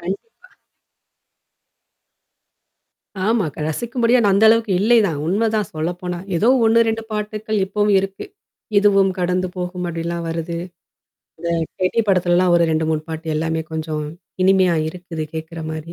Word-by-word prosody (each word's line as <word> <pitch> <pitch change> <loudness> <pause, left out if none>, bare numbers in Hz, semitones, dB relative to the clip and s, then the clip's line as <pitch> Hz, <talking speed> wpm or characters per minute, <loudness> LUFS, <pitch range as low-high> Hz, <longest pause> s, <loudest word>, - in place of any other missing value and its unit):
கண்டிப்பா. 330 - -7 2.8
ஆமா. 225 -2 +2 0.2
ரசிக்கும் 235 - -3
படியா 240 +2 +5
நா 200 - +4
அந்த 205 - +4
அளவுக்கு 225 -2 +3
இல்லைதான். 210 -8 +3
உண்மதான் 215 +1 0
சொல்ல 155 +2 -1
போனா. 180 -1 -4 0.2
ஏதோ 220 +8 +2 0.2
ஒண்ணு, 225 +1 +4
2 225 0 -1
பாட்டுக்கள் 215 0 -2
இப்பவும் 205 +1 +1
இருக்கு. 195 - -4 0.5
இதுவும் 195 -1 +4
கடந்து 180 +1 0
போகும் 180 0 -4
அப்டிலாம் 170 0 -3
வருது. 165 +1 -3 0.8
அந்த 170 - -4 0.3
கேட்டி 185 +5 +2
படத்துலல்லாம் 180 -1 +3
ஒரு 170 - +4
2 160 0 +1
3ணு 155 - 0
பாட்டு 160 +1 -6
எல்லாமே 160 +1 -1
கொஞ்சம் 155 -1 -3 0.4
இனிமையா 185 -2 +4
இருக்குது 175 -2 -6
கேட்கற 160 +1 -6
மாரி. 160 +2 -6
185 Hz, 130 wpm, -20 LUFS, 165-210 Hz, 2.8 s, படியா